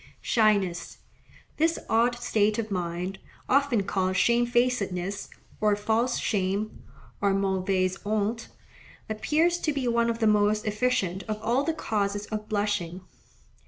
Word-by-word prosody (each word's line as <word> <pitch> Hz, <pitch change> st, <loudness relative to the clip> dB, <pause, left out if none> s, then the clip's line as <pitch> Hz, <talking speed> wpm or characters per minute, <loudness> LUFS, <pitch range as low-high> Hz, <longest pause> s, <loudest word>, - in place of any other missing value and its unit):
Shyness.—This 215 Hz, -, -1 dB
odd 235 Hz, +2 st, +3 dB
state 215 Hz, -3 st, +1 dB
of 220 Hz, -2 st, -3 dB
mind, 180 Hz, +1 st, -3 dB, 0.3 s
often 270 Hz, -6 st, +3 dB
called 190 Hz, -1 st, -1 dB
shamefacedness, 235 Hz, -5 st, +1 dB, 0.3 s
or 210 Hz, -1 st, +3 dB
false 225 Hz, +4 st, 0 dB
shame, 200 Hz, +1 st, -1 dB, 0.4 s
or 200 Hz, -1 st, +2 dB
mauvaise 190 Hz, -1 st, 0 dB
honte, 215 Hz, +2 st, -1 dB, 0.6 s
appears 315 Hz, +11 st, +1 dB
to 310 Hz, -, 0 dB
be 275 Hz, -3 st, -2 dB
one 235 Hz, 0 st, +2 dB
of 230 Hz, -, -1 dB
the 225 Hz, -, 0 dB
most 210 Hz, 0 st, +3 dB
efficient 210 Hz, -4 st, 0 dB
of 215 Hz, -1 st, -3 dB
all 245 Hz, +5 st, +2 dB
the 325 Hz, +1 st, -1 dB
causes 205 Hz, -5 st, -1 dB
of 215 Hz, 0 st, -5 dB
blushing. 205 Hz, -4 st, -1 dB
210 Hz, 125 wpm, -27 LUFS, 195-235 Hz, 0.6 s, odd